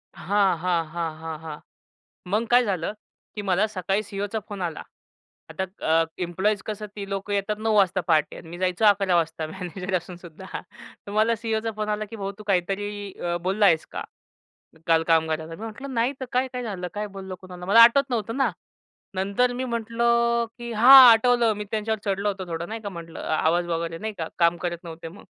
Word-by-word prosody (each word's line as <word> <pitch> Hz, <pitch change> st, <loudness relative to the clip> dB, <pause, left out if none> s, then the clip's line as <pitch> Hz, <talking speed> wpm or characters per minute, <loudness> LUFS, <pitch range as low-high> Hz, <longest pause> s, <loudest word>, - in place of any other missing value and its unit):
हां, 195 Hz, -3 st, +1 dB
हां. 170 Hz, -1 st, 0 dB
हां, 165 Hz, -1 st, -4 dB
हां. 160 Hz, -1 st, -5 dB
हां. 155 Hz, -2 st, -8 dB, 0.7 s
मग 225 Hz, +2 st, +1 dB
काय 245 Hz, 0 st, +6 dB
झालं? 190 Hz, -3 st, -2 dB, 0.4 s
की 210 Hz, -, -4 dB
मला 195 Hz, +2 st, +2 dB
सकाळी 195 Hz, 0 st, -1 dB
सी-ई-ओचा 205 Hz, +2 st, -4 dB
फोन 200 Hz, -3 st, -6 dB
आला. 165 Hz, -2 st, -3 dB, 0.7 s
आता 190 Hz, -, -3 dB, 0.3 s
अ, 165 Hz, 0 st, +4 dB, 0.2 s
इम्प्लॉइज 190 Hz, +4 st, 0 dB
कसं 210 Hz, 0 st, -4 dB
ती 200 Hz, -1 st, -6 dB
लोकं 195 Hz, +1 st, -3 dB
येतात 200 Hz, +1 st, -1 dB
9 220 Hz, 0 st, 0 dB
वाजता 190 Hz, -2 st, +3 dB
पहाटे 155 Hz, -2 st, +2 dB
आणि 160 Hz, -, -11 dB
मी 175 Hz, +1 st, -8 dB
जायचो 185 Hz, +3 st, 0 dB
11 195 Hz, -3 st, +4 dB
वाजता 160 Hz, -1 st, -1 dB
मॅनेजर 180 Hz, +2 st, -6 dB
असून 175 Hz, 0 st, -6 dB
सुद्धा. 175 Hz, +1 st, -12 dB, 0.6 s
तर -, -, -7 dB
मला 220 Hz, +2 st, +3 dB
सी-ई-ओचा 225 Hz, 0 st, -2 dB
फोन 215 Hz, 0 st, -3 dB
आला 210 Hz, 0 st, -1 dB
की 225 Hz, -, -7 dB
"भाऊ 200 Hz, -1 st, -4 dB
तू -, -, -9 dB
काहीतरी 200 Hz, +2 st, -1 dB
अ, 175 Hz, 0 st, -1 dB
बोलला 195 Hz, +3 st, +2 dB
आहेस 160 Hz, -3 st, +3 dB
का? -, -, -4 dB, 0.8 s
काल 165 Hz, -1 st, +4 dB
कामगाराला." 160 Hz, 0 st, +1 dB
मी 210 Hz, -, -11 dB
म्हटलं, 265 Hz, +5 st, -7 dB
"नाही 235 Hz, +4 st, +1 dB
तर -, -, -2 dB
काय, 255 Hz, +1 st, +1 dB
काय 250 Hz, 0 st, -4 dB
झालं 185 Hz, -6 st, -4 dB
काय 210 Hz, 0 st, -3 dB
बोललो 190 Hz, -1 st, -6 dB
कुणाला?" 180 Hz, -1 st, -10 dB
मला 225 Hz, +4 st, +6 dB
आठवत 270 Hz, +3 st, +5 dB
नव्हतं 230 Hz, 0 st, -2 dB
ना. 265 Hz, -6 st, +2 dB, 0.6 s
नंतर 200 Hz, +6 st, +1 dB
मी 255 Hz, +1 st, -3 dB
म्हटलं 235 Hz, 0 st, +1 dB
की 235 Hz, -1 st, -6 dB
"हां, 240 Hz, +5 st, +8 dB, 0.2 s
आठवलं 235 Hz, 0 st, +3 dB
मी 210 Hz, -, -4 dB
त्यांच्यावर 220 Hz, 0 st, -1 dB
चढलो 200 Hz, +1 st, 0 dB
होतं 190 Hz, -2 st, -4 dB
थोडं 165 Hz, +2 st, -4 dB
नाही 225 Hz, +1 st, -5 dB
का, 205 Hz, -, -5 dB
म्हटलं 170 Hz, -3 st, -9 dB
आवाज 165 Hz, +2 st, +1 dB
वगैरे 165 Hz, 0 st, -3 dB
नाही 220 Hz, 0 st, -4 dB
का? 160 Hz, -, -3 dB
काम 170 Hz, 0 st, +4 dB
करत 170 Hz, -1 st, -2 dB
नव्हते 165 Hz, 0 st, -8 dB
मग." 200 Hz, +5 st, -14 dB
200 Hz, 195 wpm, -25 LUFS, 175-220 Hz, 0.8 s, हां